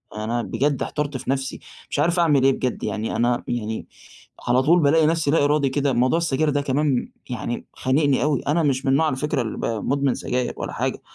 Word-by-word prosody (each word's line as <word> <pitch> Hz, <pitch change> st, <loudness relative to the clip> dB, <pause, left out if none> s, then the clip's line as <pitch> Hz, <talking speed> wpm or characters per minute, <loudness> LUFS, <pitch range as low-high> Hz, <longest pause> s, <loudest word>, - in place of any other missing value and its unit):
أنا 115 Hz, +3 st, -2 dB
بجد 135 Hz, +4 st, -1 dB
احترت 145 Hz, -2 st, -3 dB
في 130 Hz, -, -8 dB
نفسي 135 Hz, 0 st, -2 dB, 0.3 s
مش -, -, -2 dB
عارف 170 Hz, +3 st, +2 dB
أعمل 150 Hz, -6 st, +3 dB
إيه 135 Hz, -, +5 dB
بجد، 125 Hz, -1 st, -3 dB
يعني 110 Hz, +1 st, -2 dB
أنا 120 Hz, 0 st, +1 dB
يعني 110 Hz, -2 st, -3 dB, 0.6 s
على 125 Hz, +1 st, +4 dB
طول 170 Hz, +6 st, +5 dB
بالاقي 155 Hz, +2 st, +4 dB
نفسي 160 Hz, -2 st, +1 dB
لا 160 Hz, -, +3 dB
إرادي 145 Hz, -1 st, +2 dB
كده 140 Hz, 0 st, 0 dB
موضوع 130 Hz, +6 st, +2 dB
السجاير 155 Hz, -2 st, +1 dB
ده 145 Hz, 0 st, +1 dB
كمان 140 Hz, -1 st, 0 dB, 0.2 s
يعني 120 Hz, -1 st, -4 dB
خانقني 140 Hz, +1 st, +1 dB
أوي 150 Hz, -2 st, +1 dB
أنا 160 Hz, +3 st, +2 dB
مش 135 Hz, -2 st, 0 dB
من 135 Hz, -, +2 dB
النوع 140 Hz, +4 st, +3 dB
على 150 Hz, -, 0 dB
فكرة 150 Hz, 0 st, -1 dB
اللي 110 Hz, -3 st, -4 dB
ب -, -, -3 dB
مدمن 135 Hz, +4 st, 0 dB
سجاير 125 Hz, 0 st, -2 dB
ولا -, -, -5 dB
حاجة، -, -, -2 dB
140 Hz, 210 wpm, -23 LUFS, 125-150 Hz, 0.6 s, إيه